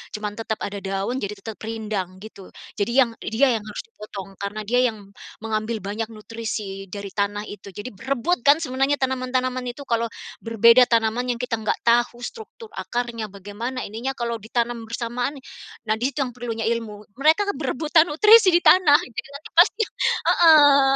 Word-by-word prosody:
cuman 210 Hz, -1 st, -4 dB
tetap 220 Hz, -1 st, -2 dB
ada 200 Hz, 0 st, -4 dB
daun 195 Hz, +6 st, -3 dB
jadi 205 Hz, -2 st, -4 dB
tetap 215 Hz, +2 st, -9 dB
rindang 215 Hz, -4 st, -4 dB
gitu. 200 Hz, -3 st, -11 dB, 0.3 s
Jadi 205 Hz, +4 st, 0 dB
yang 255 Hz, -3 st, +4 dB
dia 250 Hz, +5 st, +1 dB
yang -, -, -1 dB
harus 210 Hz, -, -6 dB
dipotong 205 Hz, -, -10 dB
karena 205 Hz, +2 st, -4 dB
dia 245 Hz, +4 st, +2 dB
yang 205 Hz, -3 st, -8 dB, 0.3 s
mengambil 220 Hz, 0 st, -2 dB
banyak 210 Hz, +3 st, -3 dB
nutrisi 215 Hz, -3 st, -6 dB
dari 200 Hz, +1 st, -7 dB
tanah 205 Hz, +1 st, -1 dB
itu 205 Hz, -1 st, -10 dB
jadi 210 Hz, +5 st, -6 dB
berebut 265 Hz, -, -1 dB
kan 300 Hz, +3 st, +6 dB
sebenarnya 270 Hz, 0 st, +1 dB
tanaman-tanaman 255 Hz, -1 st, -1 dB
itu 245 Hz, +4 st, -6 dB
kalau 230 Hz, -3 st, 0 dB, 0.4 s
berbeda 230 Hz, +2 st, +6 dB
tanaman 235 Hz, +2 st, +1 dB
yang -, -, -11 dB
kita 240 Hz, -2 st, -2 dB
enggak 215 Hz, -, 0 dB
tahu 240 Hz, +1 st, +2 dB
struktur 445 Hz, -, -9 dB
akarnya, 235 Hz, -2 st, -4 dB
bagaimana 205 Hz, +6 st, -6 dB
ininya 235 Hz, +6 st, -4 dB
kalau 235 Hz, -1 st, -3 dB
ditanam 230 Hz, +1 st, -2 dB
bersamaan, 240 Hz, +4 st, -3 dB, 0.5 s
nah 215 Hz, -, +2 dB
di 250 Hz, -, +1 dB
situ 275 Hz, +2 st, -1 dB
yang 250 Hz, -, -5 dB
perlunya 230 Hz, -2 st, -4 dB
ilmu. 225 Hz, -3 st, -3 dB, 0.2 s
Mereka 320 Hz, +7 st, +3 dB
berebutan 310 Hz, +4 st, +2 dB
nutrisi 400 Hz, +4 st, +6 dB
di 350 Hz, -, +3 dB
tanah 315 Hz, -6 st, +7 dB
gitu 240 Hz, -1 st, -7 dB, 0.2 s
kan 295 Hz, -, -9 dB, 0.2 s
pasti 405 Hz, +5 st, +5 dB, 0.5 s
heeh. 290 Hz, -5 st, +6 dB
235 Hz, 165 wpm, -23 LUFS, 215-265 Hz, 0.5 s, tanah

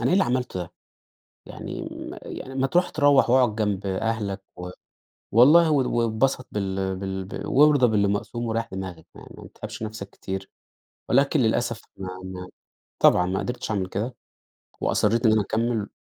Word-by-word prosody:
أنا 115 Hz, -, 0 dB
إيه -, -, +2 dB
اللي 195 Hz, +1 st, +4 dB
عملته 125 Hz, -6 st, -1 dB
ده؟ 90 Hz, 0 st, -7 dB, 0.7 s
يعني -, -, -7 dB
م -, -, -7 dB
يعني 130 Hz, -, -8 dB
ما 135 Hz, 0 st, +1 dB
تروح 175 Hz, +6 st, +2 dB
تروّح 145 Hz, -4 st, +4 dB
وأقعد 125 Hz, -4 st, +4 dB
جنب 105 Hz, -2 st, -1 dB
أهلك، 100 Hz, 0 st, -2 dB
و 90 Hz, 0 st, -6 dB, 0.6 s
والله 155 Hz, +9 st, +7 dB
و 135 Hz, -4 st, +2 dB
واتبسط 125 Hz, +3 st, 0 dB
بال 95 Hz, -1 st, -2 dB, 0.3 s
بال 95 Hz, -, -6 dB
وارضى 145 Hz, -2 st, +5 dB
باللي 105 Hz, -3 st, +2 dB
مقسوم 105 Hz, +4 st, -2 dB
وريّح 115 Hz, 0 st, -2 dB
دماغك، 95 Hz, -4 st, -6 dB
يعني -, -, -13 dB
ما -, -, -10 dB
تتعبش -, -, -8 dB
نفسك 110 Hz, -2 st, -6 dB
كتير. 95 Hz, 0 st, -6 dB, 0.6 s
ولكن 140 Hz, +3 st, +3 dB
للأسف 115 Hz, -1 st, 0 dB
ما 95 Hz, -1 st, -6 dB, 0.2 s
ما 90 Hz, -1 st, -7 dB, 0.5 s
طبعًا 90 Hz, -, +6 dB
ما 95 Hz, +1 st, -1 dB
قدرتش 115 Hz, +5 st, -4 dB
أعمل 100 Hz, -4 st, 0 dB
كده. 105 Hz, +7 st, -3 dB, 0.7 s
وأصريت 115 Hz, +3 st, +1 dB
إن 110 Hz, -, +6 dB
أنا 110 Hz, -, +4 dB
أكمل 110 Hz, +1 st, -1 dB
110 Hz, 160 wpm, -25 LUFS, 95-125 Hz, 0.7 s, والله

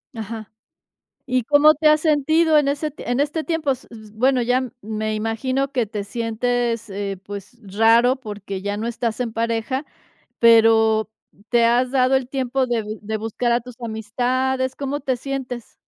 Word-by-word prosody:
Ajá. 220 Hz, -1 st, -7 dB, 0.7 s
¿Y 255 Hz, -1 st, +1 dB
cómo 295 Hz, +4 st, +6 dB
te 310 Hz, +1 st, +1 dB
has 305 Hz, 0 st, +5 dB
sentido 315 Hz, +1 st, +3 dB
en 290 Hz, -, 0 dB
ese 295 Hz, +2 st, -1 dB
ti 285 Hz, -, -11 dB
en 245 Hz, +2 st, -1 dB
este 295 Hz, +3 st, 0 dB
tiempo?, 325 Hz, -4 st, 0 dB
s 260 Hz, -1 st, -5 dB
s 220 Hz, -2 st, -12 dB
bueno 250 Hz, +3 st, +2 dB
ya, 250 Hz, +1 st, 0 dB
me 215 Hz, 0 st, -3 dB
imagino 255 Hz, +5 st, -1 dB
que 245 Hz, -5 st, 0 dB
te 205 Hz, -1 st, -4 dB
sientes, 230 Hz, +1 st, -2 dB
eh, 195 Hz, 0 st, -4 dB
pues 205 Hz, +4 st, -9 dB
raro 225 Hz, +5 st, +4 dB
porque 205 Hz, -5 st, -7 dB
ya 205 Hz, +1 st, -3 dB
no 220 Hz, -, -3 dB
estás 235 Hz, -1 st, -2 dB
en 235 Hz, -3 st, -3 dB
pareja, 230 Hz, +5 st, -1 dB, 0.5 s
pero, 225 Hz, -1 st, +5 dB, 0.4 s
¿te 235 Hz, -1 st, +4 dB
has 245 Hz, +2 st, +2 dB
dado 260 Hz, 0 st, +3 dB
el 265 Hz, -2 st, -1 dB
tiempo 265 Hz, 0 st, -1 dB
de 240 Hz, -2 st, 0 dB
vi 215 Hz, +1 st, -6 dB
de 215 Hz, +1 st, -3 dB
buscar 225 Hz, +2 st, -1 dB
a 240 Hz, -, +2 dB
tus 250 Hz, +1 st, -11 dB
amistades, 255 Hz, +4 st, -1 dB
cómo 285 Hz, +1 st, -3 dB
te 260 Hz, -1 st, -1 dB
sientes? 255 Hz, -3 st, -6 dB
240 Hz, 175 wpm, -21 LUFS, 220-265 Hz, 0.7 s, cómo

